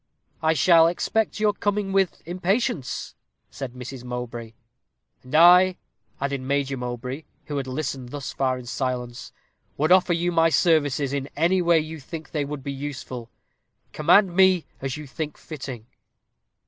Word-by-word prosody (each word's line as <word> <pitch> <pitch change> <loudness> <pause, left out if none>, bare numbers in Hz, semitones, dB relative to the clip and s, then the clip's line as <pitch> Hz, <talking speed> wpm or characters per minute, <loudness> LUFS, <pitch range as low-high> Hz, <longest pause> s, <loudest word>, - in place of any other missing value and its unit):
"I 160 0 +3
shall 165 +1 +6
expect 215 +6 -1
your 210 -1 +3
coming 205 -1 -1
with 195 -2 +1
impatience," 180 - -1 0.4
said 135 -3 -6
Mrs. 125 0 -8
Mowbray. 120 -2 -6 0.7
"And 130 +4 -6
I," 180 +3 +7 0.4
added 140 -1 -2
Major 140 +1 -1
Mowbray, 125 +3 -5 0.2
who 145 - -4
had 135 -1 -3
listened 130 -2 -4
thus 140 0 -6
far 130 -1 0
in 125 - -9
silence, 125 0 -4 0.5
"would 155 +4 +1
offer 185 -1 +5
you 175 +1 0
my 165 -1 +4
services 145 -5 +2
in 140 0 -3
any 175 +5 +2
way 170 -1 +4
you 155 +1 -6
think 160 +3 -9
they 150 -3 -1
would 145 -1 -6
be 140 - -4
useful. 130 -4 -6 0.6
Command 180 +4 +4
me 190 -2 +5 0.2
as 135 +1 -3
you 150 - -8
think 150 +2 -5
fitting." 130 -7 -8
145 Hz, 150 wpm, -24 LUFS, 130-170 Hz, 0.7 s, I